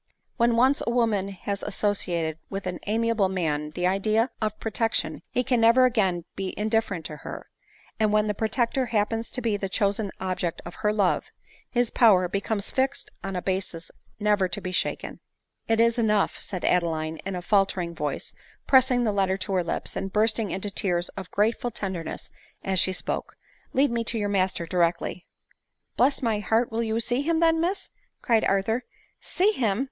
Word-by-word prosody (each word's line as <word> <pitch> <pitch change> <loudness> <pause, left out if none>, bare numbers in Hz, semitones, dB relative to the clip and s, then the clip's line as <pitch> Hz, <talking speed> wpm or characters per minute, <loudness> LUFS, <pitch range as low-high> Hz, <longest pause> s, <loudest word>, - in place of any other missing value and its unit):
When 235 -1 +3
once 260 +4 +4
a - - -1
woman 225 -5 +1
has 200 +1 -4
associated 175 -6 -1
with 195 -1 -5
an 180 -1 -3
amiable 225 -2 +2
man 150 -5 -1
the 175 +3 -3
idea 215 +6 +2
of 215 -1 -2
protection, 225 +1 -1
he 250 - 0
can 245 -2 +1
never 235 +3 +6
again 190 -9 +1
be 195 -1 -4
indif 220 +1 +1
ferent 180 -5 -5
to 150 0 -6
her; - - -9 0.5
and 215 -1 +3
when 210 0 +3
the 210 - 0
protector 235 +4 0
happens 225 +1 0
to 250 - -3
be 220 -3 +1
the 195 -1 -3
chosen 200 +1 0
object 185 -2 -2
of 170 - -7
her 210 -1 +3
love, 200 -4 +1 0.4
his 245 -2 +1
power 195 -6 +5
becomes 200 +2 -2
fixed 265 +1 -1
on 195 -1 -4
a 180 - -3
basis 185 -3 -2 0.3
never 205 -2 +2
to 175 - -4
be 185 - -5
shaken. 185 - -2 0.2
" - - -53
It 225 0 +2
is 230 +1 +3
enough," 215 -3 +1
said 185 -3 -4
Adeline 160 -2 +1
in 195 +2 -5
a 180 - -3
faltering 190 -3 +1
voice, 150 -3 -4 0.3
pressing 260 -2 +4
the 220 - +2
letter 190 -1 +1
to 195 +1 -4
her 185 -2 +2
lips, 170 - -3
and 195 0 -3
bursting 220 0 +1
into 195 +2 -2
tears 175 -3 0
of 190 -3 -8
grateful 225 +4 +1
tenderness 190 -7 -5 0.3
as 190 -1 +1
she 185 - +3
spoke; 185 - -3 0.2
" - - -35
Lead 270 0 +3
me 235 0 0
to 230 - -1
your 205 -1 -1
master 190 -3 0
directly." 170 +1 0 0.7
"Bless 270 +2 +2
my 225 -3 +1
heart! 225 +3 +1
will 225 +1 -1
you 225 0 0
see 245 +3 +1
him 325 +2 +1
then, 325 -1 +4
Miss?" 365 +4 -2 0.3
cried 230 -2 +3
Arthur. 210 +5 +1 0.2
" - - -44 0.2
See 390 +4 +4
him 220 - 0
205 Hz, 190 wpm, -26 LUFS, 185-230 Hz, 0.7 s, never